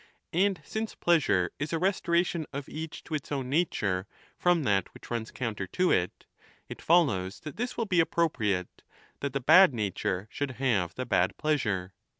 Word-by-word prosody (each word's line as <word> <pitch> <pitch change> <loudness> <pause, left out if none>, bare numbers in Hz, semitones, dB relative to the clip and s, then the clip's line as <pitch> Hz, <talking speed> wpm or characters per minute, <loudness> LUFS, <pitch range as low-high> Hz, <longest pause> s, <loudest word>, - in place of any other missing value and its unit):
and 190 +2 +2
since 220 0 -4
pleasure 130 - +2
is 145 +2 -3
a 165 - +1
restoration 170 -3 +1
of 140 0 -5
each 160 0 -7
to - - -9
its 150 -1 -3
own 135 -3 -2
nature 100 - 0 0.3
from 175 -3 +2
that 95 -6 +1
which - - -13
runs 115 -2 -2
counter 110 -6 -4
to 180 - +1
it, 90 -1 0 0.4
it - - -9
follows 105 - +2
that 150 - -8
this 245 +2 -3
will 230 - 0
be 185 -4 +2
appropriate, 110 - 0 0.4
that 140 - -2
the 140 - 0
bad 160 +3 +7
nature 100 -2 -2
should 140 -2 -3
have 105 -10 0
the 130 - -3
bad - - +1
pleasure. 105 -12 -1
140 Hz, 170 wpm, -29 LUFS, 105-170 Hz, 0.4 s, bad